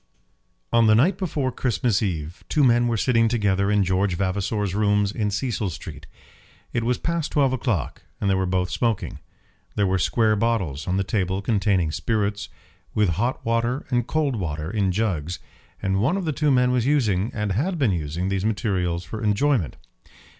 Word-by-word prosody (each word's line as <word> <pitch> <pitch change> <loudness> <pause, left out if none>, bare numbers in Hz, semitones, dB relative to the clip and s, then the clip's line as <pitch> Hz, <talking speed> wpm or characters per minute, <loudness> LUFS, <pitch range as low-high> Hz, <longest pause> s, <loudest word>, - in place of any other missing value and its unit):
On 115 -1 +5
the 110 - +6
night 145 - +3
before 150 -8 -1
Christmas 120 -3 0
Eve 85 -4 -3
two 150 - +2
men 120 -1 +4
were 115 -1 0
sitting 115 0 +3
together 100 -4 +1
in 105 -1 +3
George 95 0 +1
Vavasor's 100 +1 -1
rooms 105 -1 +2
in 105 -2 -1
Cecil 105 0 -2
Street. 80 -3 -9 0.7
It 115 - 0
was 125 +1 +1
past 170 -2 -2
twelve 135 -3 +3
o'clock, 120 -7 -2 0.2
and 100 - -1
they 100 - +3
were 95 -1 0
both 90 0 0
smoking; 115 0 -1 0.6
there 100 - +2
were 95 0 +1
square 110 +6 +2
bottles 100 -10 -1
on 90 +1 0
the 100 - +1
table 95 -1 -1
containing 100 -6 +1
spirits, 100 +4 -1 0.5
with 105 -3 +3
hot 115 - -1
water 115 +3 0
and 120 -2 +1
cold 145 -6 0
water 80 -3 -3
in 100 -3 +1
jugs, 90 -5 -1 0.5
and 95 0 +1
one 150 - +2
of 190 - -3
the 155 - -1
two 150 +1 +1
men 125 -2 +3
was 125 -1 +1
using, 110 -9 +2
and 105 -2 -1
had 165 - 0
been 130 -9 +2
using, 85 +2 -2
these 95 -1 -1
materials 95 -6 -1
for 110 +8 -6
enjoyment. 105 - +1
105 Hz, 180 wpm, -24 LUFS, 95-120 Hz, 0.7 s, the